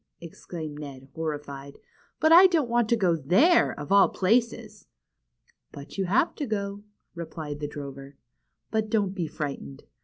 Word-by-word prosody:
exclaimed 160 -2 -8
Ned, 135 -2 -9
horrified. 145 -3 -6 0.4
But 315 - +3
I 355 +3 +9
don't 325 -8 +1
want 235 -2 +2
to 235 - +4
go 185 -6 +2
there, 195 - +4
of 145 +3 -7
all 200 0 +6
places." 220 0 -1 0.9
^^But 140 +1 -10
you 190 - +1
have 215 - +2
to 290 - -3
go," 200 -1 -3 0.3
replied 160 -3 -7
the 150 - -3
drover. 140 -1 -9 0.6
^^But 220 -1 0
don't 205 -3 0
be 175 -5 -3
frightened. 140 - -6
175 Hz, 150 wpm, -26 LUFS, 145-220 Hz, 0.9 s, I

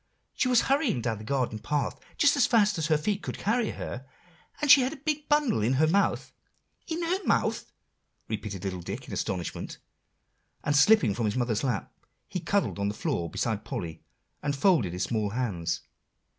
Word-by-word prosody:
She - - 0
was 250 -2 +5
hurrying 275 - +1
down 110 -3 -1
the - - -9
garden 125 -2 -1
path, 145 +6 -2 0.2
just 290 -2 +5
as 280 - +4
fast 210 -6 +3
as 155 - 0
her 155 -2 +3
feet 200 +6 -2
would - - -4
carry 225 +1 0
her, 130 +2 -6 0.5
and 295 -2 +4
she 275 - +9
had 255 +3 0
a - - -9
big 300 +1 -3
bundle 295 - +3
in 115 +5 +2
her 145 +4 +4
mouth" 195 +6 +1 0.5
"In 335 0 -2
her 365 +4 -1
mouth?" - - 0 0.6
repeated 105 -4 -5
little 95 -2 -3
Dick - - -6
in - - -7
astonishment; 90 -2 -3 0.9
and, 145 - +1
slipping 145 - +5
from 115 +2 -2
his 105 - 0
mother's 120 -3 0
lap, 125 -7 -2 0.3
he 180 - -3
cuddled 200 - 0
on 100 - 0
the 105 - -2
floor 110 - -2
beside 110 +4 -2
Polly, 85 - -5 0.4
and 145 -1 -1
folded 140 - +3
his 90 - -2
small 110 -3 -1
hands. 100 -8 -2
140 Hz, 185 wpm, -28 LUFS, -, 0.9 s, she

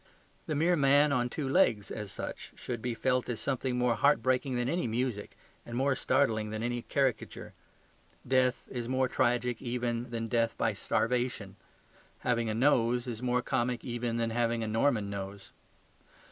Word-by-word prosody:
The 155 - -1
mere 170 +4 +3
man 145 0 +4
on 125 -3 +1
two 140 +2 -3
legs, 130 - +2
as 105 -3 -5
such, - - -6
should 120 -3 -5
be 120 -1 -2
felt 125 +1 0
as 120 -2 -2
something 130 -2 -1
more 125 -1 +2
heartbreaking 130 +1 +2
than 120 0 0
any 170 +1 0
music 115 -2 -2 0.3
and 120 0 -6
more 135 +1 +2
startling 125 -5 +1
than 110 +1 -4
any 120 0 -1
caricature. 135 0 -2 0.7
Death 130 0 +2
is 120 -1 -4
more 130 0 +2
tragic 120 -1 0
even 120 -1 -2
than 115 -1 -3
death 115 0 0
by 115 -1 +1
starvation. 115 -1 -1 0.7
Having 120 -2 0
a 110 - -1
nose 120 -1 +3
is 120 -2 -5
more 125 0 +1
comic 125 -2 -1
even 120 -1 -2
than 115 -1 0
having 115 0 0
a - - -2
Norman 110 -1 +1
nose. 100 0 -7
120 Hz, 165 wpm, -30 LUFS, 115-130 Hz, 0.7 s, man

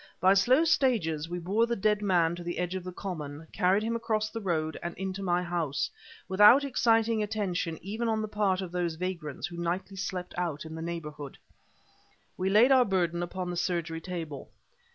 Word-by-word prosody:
By 185 +2 +5
slow 250 +10 +4
stages 190 - +1
we 175 - -3
bore 200 +7 +1
the 235 - 0
dead 210 0 +1
man 175 -5 +2
to 175 - -8
the 175 0 -4
edge 180 0 -2
of 185 -1 -4
the 185 - -6
common, 160 -5 -6
carried 190 +4 +2
him 230 +1 -1
across 220 -2 -1
the 225 - -5
road 160 -5 -1
and 170 0 -5
into 190 +1 -4
my 180 -2 +1
house, 170 -5 -1 0.4
without 210 +8 +7
exciting 230 -4 +2
attention 195 -6 -2
even 220 +5 -3
on 220 -1 +1
the - - -2
part 205 -3 0
of 185 -2 -6
those 175 -2 -1
vagrants 170 -4 -4
who 175 -1 -7
nightly 180 +3 -3
slept 185 -2 -4
out 165 -4 -2
in 160 - -8
the 160 - -6
neighborhood. 150 -4 -6 1.0
We 185 +1 -1
laid 220 +7 +6
our 260 -1 +7
burden 175 -5 0
upon 180 +1 -4
the - - -4
surgery 170 -2 -2
table. 165 -6 -6
185 Hz, 195 wpm, -29 LUFS, 170-210 Hz, 1.0 s, without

